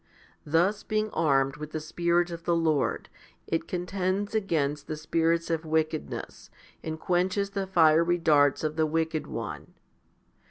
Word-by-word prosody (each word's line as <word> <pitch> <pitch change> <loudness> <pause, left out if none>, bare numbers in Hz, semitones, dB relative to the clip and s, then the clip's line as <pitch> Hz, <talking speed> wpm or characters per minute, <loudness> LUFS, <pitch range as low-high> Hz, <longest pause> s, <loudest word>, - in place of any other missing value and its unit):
Thus, 175 +7 +2
being 215 0 -1
armed 135 -3 +1
with 150 0 -8
the 155 - -2
Spirit 170 +2 0
of 170 0 -7
the 170 - +2
Lord, 160 -4 0 0.4
it 165 - -2
contends 185 +3 -2
against 150 -9 -1
the 155 - -4
spirits 165 +2 0
o4 165 -1 -1
wickedness, 155 -1 -3 0.3
and 160 0 -5
quenches 185 +3 0
the 195 -1 -3
fiery 170 -1 +4
darts 145 -4 +3
of 155 0 -2
the 160 -1 +2
wicked 160 0 -1
one. - - -6
165 Hz, 145 wpm, -27 LUFS, 155-180 Hz, 0.4 s, fiery